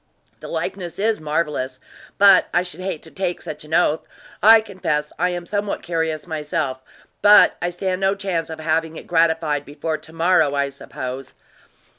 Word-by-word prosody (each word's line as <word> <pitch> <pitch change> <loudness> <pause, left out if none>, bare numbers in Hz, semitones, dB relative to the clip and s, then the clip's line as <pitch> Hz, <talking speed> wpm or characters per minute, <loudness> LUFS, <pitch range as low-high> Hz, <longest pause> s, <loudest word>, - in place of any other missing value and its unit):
"The - - -9
likeness 175 -4 -4
is 215 -2 0
marvelous; 150 -4 -2 0.4
but 195 -2 +6
I 175 - +4
should 180 -2 -8
hate 185 -4 -4
to 160 - -12
take 185 -2 -2
such 150 0 -7
an 155 +2 -2
oath. 160 -3 +3 0.4
I 225 +3 +8
confess 180 -8 -2
I 180 +1 +2
am 175 -1 -4
somewhat 205 +2 -3
curious 160 -2 -2
myself; 150 -4 -3 0.4
but 205 +1 +7
I 175 - 0
stand 185 +1 -3
no 195 +1 +2
chance 190 -5 -2
of 160 0 -7
having 160 0 -1
it - - -9
gratified 160 -3 +1
before 155 +2 -4
to 155 +1 -14
morrow, 165 -3 +3
I 140 0 0
suppose." 130 -1 -7
165 Hz, 170 wpm, -21 LUFS, 150-185 Hz, 0.4 s, I